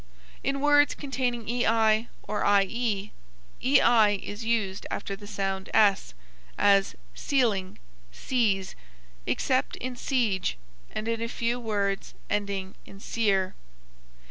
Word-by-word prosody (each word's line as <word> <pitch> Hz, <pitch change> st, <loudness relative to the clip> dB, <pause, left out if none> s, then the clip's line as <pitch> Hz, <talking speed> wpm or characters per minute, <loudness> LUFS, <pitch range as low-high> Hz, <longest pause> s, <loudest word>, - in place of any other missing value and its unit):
In 275 Hz, 0 st, -1 dB
words 290 Hz, 0 st, +4 dB
containing 250 Hz, -5 st, -2 dB
ei 225 Hz, -1 st, +2 dB, 0.2 s
or 210 Hz, -, -2 dB, 0.2 s
ie, 210 Hz, 0 st, -1 dB, 0.5 s
ei 235 Hz, -5 st, +5 dB
is 205 Hz, +3 st, -7 dB
used 220 Hz, -4 st, -1 dB
after 195 Hz, -, -4 dB
the 205 Hz, 0 st, -12 dB
sound 195 Hz, -2 st, -3 dB
s, 200 Hz, -, +3 dB, 0.4 s
as 200 Hz, -1 st, +3 dB, 0.2 s
ceiling, 220 Hz, -10 st, 0 dB, 0.3 s
seize, 200 Hz, -, 0 dB, 0.5 s
except 260 Hz, 0 st, 0 dB
in 255 Hz, 0 st, -5 dB
siege 225 Hz, -, 0 dB, 0.3 s
and 215 Hz, -, -5 dB
in 230 Hz, 0 st, -1 dB
a 230 Hz, -, -1 dB
few 235 Hz, +1 st, -1 dB
words 200 Hz, -4 st, -2 dB, 0.2 s
ending 200 Hz, -2 st, -2 dB
in 195 Hz, -, -12 dB
cier. 195 Hz, -4 st, 0 dB
215 Hz, 115 wpm, -27 LUFS, 195-240 Hz, 0.5 s, ei